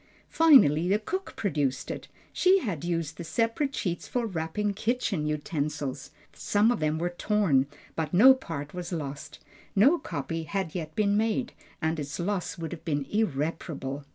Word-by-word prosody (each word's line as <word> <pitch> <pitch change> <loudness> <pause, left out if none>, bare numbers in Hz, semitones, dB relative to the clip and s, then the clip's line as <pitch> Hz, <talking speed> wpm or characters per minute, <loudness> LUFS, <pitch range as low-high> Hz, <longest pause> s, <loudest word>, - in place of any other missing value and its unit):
Finally 215 - +6
the 200 - +4
cook 375 - -5
produced 145 -10 -1
it; - - -7 0.3
she 370 +1 +5
had 175 - -3
used 165 -2 -2
the 170 - -5
separate 230 - 0
sheets 175 -2 -3
for 245 -2 -1
wrapping 195 +2 -2
kitchen 215 -7 -1
utensils. 145 -3 -3 0.2
Some 210 +3 +2
of 240 - -1
them 155 0 0
were 175 +2 -1
torn, 175 -8 +2 0.3
but 160 -2 -2
no 240 +9 +8
part 160 - -6
was 180 0 -5
lost. 150 -2 -5 0.4
No 275 - +5
copy 165 +4 -4
had 190 0 -3
yet 160 -3 -5
been 205 -1 +2
made, 225 +3 0 0.3
and 160 0 0
its 145 +2 -5
loss 185 +1 -2
would 165 -1 -5
have 175 - -7
been 145 -4 -1
irreparable. 150 -6 -2
170 Hz, 160 wpm, -28 LUFS, 150-210 Hz, 0.4 s, no